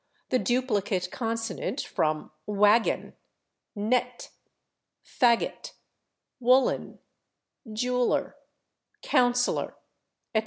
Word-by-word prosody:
the 255 Hz, -, +2 dB
duplicate 210 Hz, -8 st, 0 dB
consonant 230 Hz, +3 st, -3 dB
from 155 Hz, -1 st, -2 dB, 0.2 s
/waggon/, 210 Hz, +2 st, +3 dB, 0.6 s
/nett/, 245 Hz, +3 st, -1 dB, 0.8 s
/faggot/, 235 Hz, -2 st, +1 dB, 0.7 s
/woollen/, 255 Hz, +2 st, +2 dB, 0.7 s
/jeweller/, 250 Hz, +3 st, 0 dB, 0.7 s
/councillor/, 245 Hz, -2 st, +1 dB, 0.6 s
etc. 220 Hz, -, +4 dB
235 Hz, 65 wpm, -27 LUFS, 210-250 Hz, 0.8 s, etc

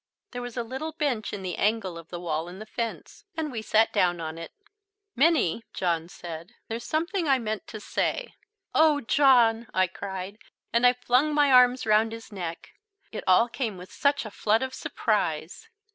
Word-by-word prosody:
There 245 Hz, -, -5 dB
was 245 Hz, 0 st, -7 dB
a 240 Hz, -, 0 dB
little 265 Hz, +7 st, -5 dB
bench 280 Hz, -9 st, -1 dB
in 200 Hz, -2 st, -6 dB
the 180 Hz, -2 st, -4 dB
angle 210 Hz, -4 st, 0 dB
of 165 Hz, -1 st, -10 dB
the 175 Hz, -, -6 dB
wall 165 Hz, -1 st, -2 dB
and 180 Hz, +2 st, -9 dB
the 215 Hz, -, -7 dB
fence, 230 Hz, +1 st, -5 dB
and 310 Hz, -2 st, -2 dB
we 225 Hz, -3 st, -4 dB
sat 220 Hz, +1 st, +2 dB
down 175 Hz, -1 st, +2 dB
on 160 Hz, 0 st, -5 dB
it. 165 Hz, -, -8 dB, 0.6 s
"Minnie," 260 Hz, -, +3 dB
John 170 Hz, -2 st, -1 dB
said, 170 Hz, +5 st, -9 dB
"there's 230 Hz, +1 st, -5 dB
something 335 Hz, +2 st, -1 dB
I 270 Hz, -1 st, +4 dB
meant 220 Hz, -4 st, -4 dB
to 215 Hz, -, -7 dB
say -, -, -2 dB, 0.2 s
" 390 Hz, -2 st, -51 dB
"Oh, 310 Hz, -2 st, +4 dB
John," 235 Hz, -4 st, +4 dB
I 185 Hz, 0 st, +4 dB
cried, 190 Hz, +2 st, -6 dB, 0.3 s
and 235 Hz, +1 st, +5 dB
I 245 Hz, -, +5 dB
flung 250 Hz, +4 st, +1 dB
my 290 Hz, -2 st, +4 dB
arms 250 Hz, 0 st, +6 dB
round 220 Hz, +1 st, +3 dB
his 225 Hz, 0 st, -10 dB
neck. 175 Hz, -4 st, -6 dB, 0.4 s
It 220 Hz, -, -5 dB
all 185 Hz, +6 st, +5 dB
came 230 Hz, -5 st, -3 dB
with 180 Hz, +1 st, -11 dB
such 285 Hz, -3 st, +1 dB
a 215 Hz, -, -7 dB
flood 220 Hz, +4 st, +1 dB
of 260 Hz, 0 st, -4 dB
surprise. 185 Hz, -, -2 dB
225 Hz, 190 wpm, -27 LUFS, 185-260 Hz, 0.6 s, arms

